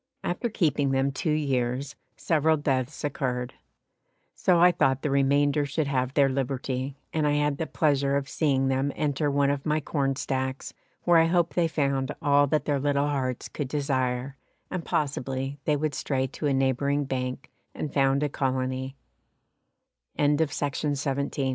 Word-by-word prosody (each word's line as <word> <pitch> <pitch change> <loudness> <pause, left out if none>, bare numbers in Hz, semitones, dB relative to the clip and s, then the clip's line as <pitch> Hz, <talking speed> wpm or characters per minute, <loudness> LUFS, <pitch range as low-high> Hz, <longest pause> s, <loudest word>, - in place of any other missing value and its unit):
After 180 +7 -2
keeping 155 -9 +1
them 135 +1 +1
two 145 +4 -3
years 135 -2 -1 0.2
several 160 0 +2
deaths 135 -1 -1
occurred, 125 -3 -2 0.8
so 180 -2 +2
I 180 +1 +7
thought 135 -5 +1
the 150 - 0
remainder 140 +1 +3
should 145 +2 -1
have 130 -1 -1
their 140 -2 +5
liberty, 135 0 -2 0.2
and 155 -2 +1
I 145 - +2
had 145 -1 +1
the 160 - -2
pleasure 140 -2 +1
of 140 -1 -3
seeing 135 -4 +1
them 135 +2 +1
enter 145 0 0
one 140 0 +2
of 140 -1 -3
my 155 0 +1
corn 140 -2 -1
stacks 130 0 -3 0.3
where 175 -1 +5
I 165 - +5
hope 170 0 +1
they 175 -2 +2
found 140 -3 -1
all 145 -2 +4
that 150 0 0
their 145 -2 +1
little 140 +1 +1
hearts 130 -3 -2
could 145 - -4
desire, 130 -2 -1 0.3
and 180 -2 -3
possibly 135 -2 -2
they 150 - +2
would 150 0 -1
stray 130 0 -1
to 140 +3 -4
a - - +2
neighbouring 140 +2 +1
bank 130 +1 -4 0.2
and 150 - -4
found 135 0 +2
a - - +2
colony. 130 -1 -2 1.2
T 145 +2 +3
140 Hz, 160 wpm, -27 LUFS, 135-150 Hz, 1.2 s, I